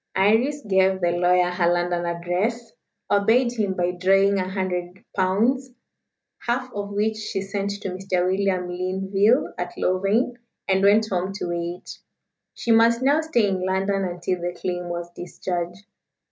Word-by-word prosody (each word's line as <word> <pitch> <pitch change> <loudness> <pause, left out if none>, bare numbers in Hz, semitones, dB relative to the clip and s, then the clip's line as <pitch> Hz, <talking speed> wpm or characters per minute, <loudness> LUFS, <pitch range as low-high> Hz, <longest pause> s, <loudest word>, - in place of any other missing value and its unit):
Iris 230 +9 +2
gave 190 -1 +3
the 175 -1 +1
lawyer 180 +1 +3
her 175 -1 +2
London 175 0 0
address, 185 +7 -2 0.4
obeyed 225 +5 +3
him 210 -5 -1
by 175 0 0
drawing 195 +2 +3
a 185 0 -2
hundred 185 -1 -4
pounds, 230 +8 +1 0.7
half 250 +1 -2
of 205 0 -4
which 210 +2 0
she 215 -2 -3
sent 200 0 -3
to - - -2
Mr. 185 -1 -1
William 185 -1 0
Linville, 190 +6 +1
at 175 0 -4
Louvain, 200 +7 +1 0.3
and 190 0 +2
went 210 +2 +5
home 185 +1 -1
to 200 - -4
wait. 175 +1 -5 0.6
She 235 - -1
must 230 +2 +4
now 285 +4 +4
stay 280 -10 +1
in 190 -2 -1
London 195 +1 0
until 175 0 -3
the 175 0 -4
claim 180 -1 -3
was 175 0 -5
discharged. 175 +1 -5
190 Hz, 150 wpm, -23 LUFS, 180-215 Hz, 0.7 s, went